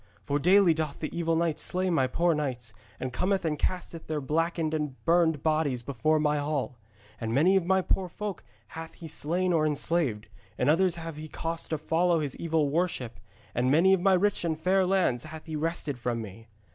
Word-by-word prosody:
For 145 0 0
daily 185 +2 +5
doth 155 -2 -3
the 155 - -5
evil 165 -1 0
knight 165 -2 0
slay 185 0 0
my 135 -6 +2
poor 170 +6 +2
knights, 125 -7 -3 0.3
and 130 -1 -4
cometh 190 0 0
and 150 -2 -1
casteth 175 -3 -3
their 155 -1 -1
blackened 160 +2 -1
and 150 -4 -2
burned 165 -3 +3
bodies 155 -6 +1
before 140 +5 +1
my 150 -1 +1
hall. 145 -4 -2 0.4
And 115 0 -2
many 175 +8 +4
of 185 -3 +1
my 190 0 +3
poor 185 0 0
folk 205 +2 -5 0.3
hath 165 0 -8
he 165 - -9
slain 175 +4 0
or 160 -2 +3
enslaved, 150 -7 0 0.3
and 135 +4 +3
others 180 +2 +3
hath 165 -2 -7
he 155 +1 -7
caused 165 +2 -4
to 160 - -1
follow 165 +3 +1
his 145 -3 -3
evil 160 -3 +1
worship, 135 - -2 0.3
and 125 +1 +1
many 170 +7 +5
of 190 - +2
my 195 +1 +4
rich 205 +1 +1
and 160 -2 -1
fair 185 +2 +2
lands 180 -11 +1
hath 155 0 -9
he 160 -2 -5
wrested 155 -4 -2
from 120 -1 -2
me.' 110 +1 -9
160 Hz, 200 wpm, -28 LUFS, 145-175 Hz, 0.4 s, daily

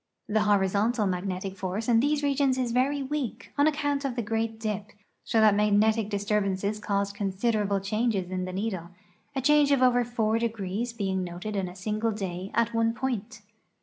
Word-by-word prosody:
The 215 +1 +2
horizontal 205 +3 +2
magnetic 185 +1 -2
force 190 +3 -3
in 235 -2 +5
these 290 +3 +1
regions 275 -2 +2
is 250 -2 -1
very 275 +3 +1
weak 270 -3 -4
on 285 +1 +4
account 290 -2 0
of 270 -3 -2
the 240 - -1
great 225 0 -2
dip, 210 -2 -4 0.3
so 225 - +1
that 215 -1 +6
mag 205 0 +3
netic 220 0 +2
disturbances 205 0 0
caused 200 -1 -1
considerable 200 0 0
changes 200 -2 -1
in 185 0 -2
the 185 - -5
needle, 190 -3 -3 0.5
a 265 - 0
change 295 +1 +4
of 275 -2 +4
over 245 -1 +4
four 225 -2 0
degrees 225 0 -2
being 190 -4 -2
noted 180 +4 -5
in 195 -2 -1
a 180 - -11
single 215 +3 -1
day 190 -2 -4
at 235 0 +2
one 230 0 +1
point. 220 -3 -3
215 Hz, 180 wpm, -27 LUFS, 195-240 Hz, 0.5 s, that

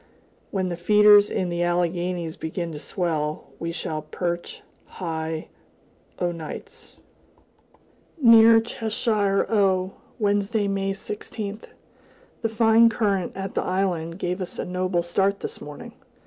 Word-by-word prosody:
When 185 -2 -1
the 175 - -4
feeders 210 +2 +6
in 180 - -1
the 175 0 -2
Alleghanies 175 -1 -1
begin 165 +1 -4
to 150 - -7
swell, 155 -5 -3
we 165 0 -3
shall 155 -2 -4
perch 170 +3 -4 0.2
high 160 -2 -4 0.7
o' 175 -1 0
nights. 165 -2 -9 1.2
Near 230 -3 +8
Cheshire, 220 -3 0
O., 190 -3 +2 0.2
Wednesday, 205 0 +1
May 195 0 -1
16th. 210 +1 -6 0.8
The 225 - 0
fine 225 +1 +5
current 200 -6 0
at 195 0 -5
the - - 0
island 180 -3 -1
gave 180 0 -3
us 180 - -5
a - - -3
noble 180 -1 -1
start 195 +3 0
this - - -6
morning. 150 -1 -9
185 Hz, 125 wpm, -24 LUFS, 170-205 Hz, 1.2 s, Near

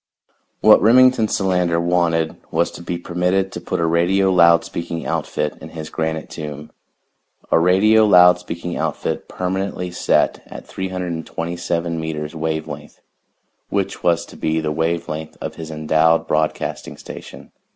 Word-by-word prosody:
What - - +7
Remington 125 0 +5
Solander 90 -4 +1
wanted 85 -2 +1
was 85 +1 0
to - - -10
be 85 0 -4
permitted 90 +2 -1
to - - -7
put - - -3
a 85 - +1
radio 90 +4 +2
loud 85 -2 +5
speaking 85 -1 -5
outfit 75 0 -2
in 80 - -9
his 80 -1 -8
granite 80 0 -3
tomb 75 -1 -8 0.8
a - - +5
radio 100 +6 +4
loud 90 -3 +6
speaking 90 0 -6
outfit - - -3
permanently 90 0 -3
set 90 - +1
at - - -10
327 85 -2 -3
meters 75 -1 -4
wave 80 0 -2
length, 75 0 -9 0.7
which 100 -1 -2
was 85 -1 +1
to - - -14
be 80 +1 -1
the 80 -1 -2
wave 80 +2 -1
length 80 0 -6
of - - -6
his 80 -1 -7
endowed 80 +1 +2
broadcasting 80 0 -2
station. - - -11
85 Hz, 145 wpm, -20 LUFS, 80-90 Hz, 0.8 s, What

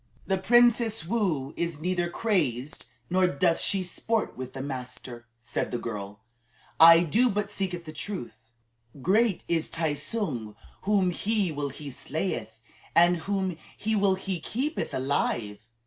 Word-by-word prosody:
"The 190 -1 0
Princess 235 -2 +4
Woo 170 - -1
is 170 -3 -2
neither 175 +1 0
crazed 150 - -1 0.2
nor 185 +4 +3
doth 170 +1 +2
she 195 -2 +1
sport 215 +5 -2
with 130 0 -7
the 135 - -5
master," 125 -3 -7 0.2
said - - -2
the 120 - -2
girl. 105 -3 -6 0.6
"I 165 +1 +10
do 220 +10 +3
but 205 -1 -2
speak 180 -4 -3
the 155 - -7
truth. 115 - -6 0.5
Great 210 +1 +2
is 165 -2 0
Tai 160 -2 0
tsung. 145 - -3 0.3
Whom 195 -4 +3
he 205 0 0
will 145 -1 -3
he 140 +1 -8
slayeth, 120 - -4 0.4
and 175 +1 +6
whom 190 0 -2 0.2
he 220 +1 -1
will 200 -2 +3
he 190 -1 -4
keepeth 270 - -3
alive." 120 -6 -1
170 Hz, 145 wpm, -27 LUFS, 135-200 Hz, 0.6 s, I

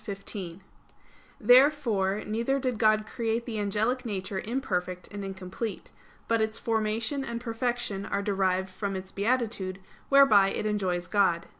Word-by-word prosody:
Therefore 245 -7 +4
neither 235 +6 0
did 255 -4 -2
God 215 -1 +4
create 230 +1 -2
the 220 -3 -3
angelic 215 +5 0
nature 195 -4 -3
imperfect 185 -7 -3
and 205 -1 -6
incomplete. 195 +3 -6 0.4
But 230 -1 +2
its 220 0 0
formation 225 +4 -1
and 235 -2 -4
perfection 235 -3 -2
are 200 0 -1
derived 190 -2 0
from 195 +1 -3
its 190 0 -6
beatitude, 210 -4 -1 0.3
whereby 270 -9 +6
it 215 - -3
enjoys 190 -4 -1
God. 175 -4 +2
215 Hz, 130 wpm, -28 LUFS, 195-235 Hz, 0.4 s, whereby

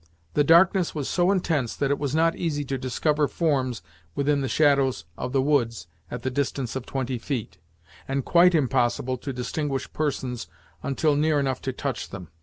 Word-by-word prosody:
The 145 - +3
darkness 170 +3 +4
was 145 -3 -2
so 175 0 +2
intense 160 - 0
that 140 -1 0
it 140 - 0
was 145 0 -1
not 165 +1 +3
easy 145 -4 -2
to 135 0 -2
discover 145 +4 +1
forms 130 - 0 0.3
within 140 0 +1
the 135 - -1
shadows 140 - +2
of 125 - -4
the 135 -1 +2
woods 130 -6 +1 0.2
at 120 -1 -6
the 130 - -1
distance 135 -2 -2
of 130 -2 -5
twenty 130 -2 -2
feet, 120 - -4 0.5
and 135 -1 -1
quite 175 +1 +5
impossible 130 -3 +1
to 135 - -5
distinguish 135 +2 -3
persons 130 -5 -2 0.3
until 145 +2 +1
near 150 0 +2
enough 135 -2 -1
to 135 - -2
touch 130 0 -4
them. 90 -5 -8
140 Hz, 180 wpm, -25 LUFS, 130-150 Hz, 0.5 s, quite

